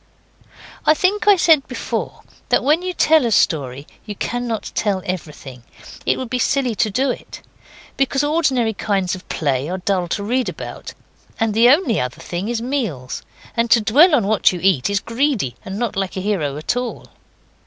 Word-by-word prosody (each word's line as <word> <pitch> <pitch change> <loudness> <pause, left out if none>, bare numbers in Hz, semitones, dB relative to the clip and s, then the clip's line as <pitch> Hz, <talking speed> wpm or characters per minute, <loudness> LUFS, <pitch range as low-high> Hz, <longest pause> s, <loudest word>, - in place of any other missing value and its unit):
I 310 - +4
think 400 +6 0
I 410 - +8
said 320 -5 +4
before 255 - -4 0.3
that - - +3
when 305 +5 +3
you 365 0 -3
tell 320 -4 +4
a 235 - +1
story 140 - +1 0.2
you 210 -2 -7
cannot 240 0 -3
tell 195 -3 -1
everything. 150 -8 -6 0.5
It - - +2
would 260 - -4
be 250 - 0
silly 260 -1 +1
to 215 +1 +1
do 255 +6 +1
it. - - -9 0.5
Because 275 +1 +1
ordinary 285 -7 +1
kinds 195 -3 -1
of 185 - -8
play 140 -1 -1
are 185 - -2
dull 185 -1 -1
to 200 +4 -3
read 250 +4 0
about; - - -8 0.4
and 225 -1 +1
the 230 +3 +5
only 265 - +3
other 125 +3 -4
thing 175 +4 -4
is 235 -1 -2
meals, 220 - -3 0.3
and 230 0 +1
to 225 +1 +6
dwell 295 - +5
on 235 -8 +1
what 210 0 +3
you 180 - -5
eat 185 -8 +3
is 200 -1 +1
greedy 230 - -1
and 190 +1 -6
not 235 -2 -2
like 195 0 -3
a - - -2
hero 170 -9 -1
at 155 - -2
all. 245 -1 -4
220 Hz, 185 wpm, -20 LUFS, 185-260 Hz, 0.5 s, I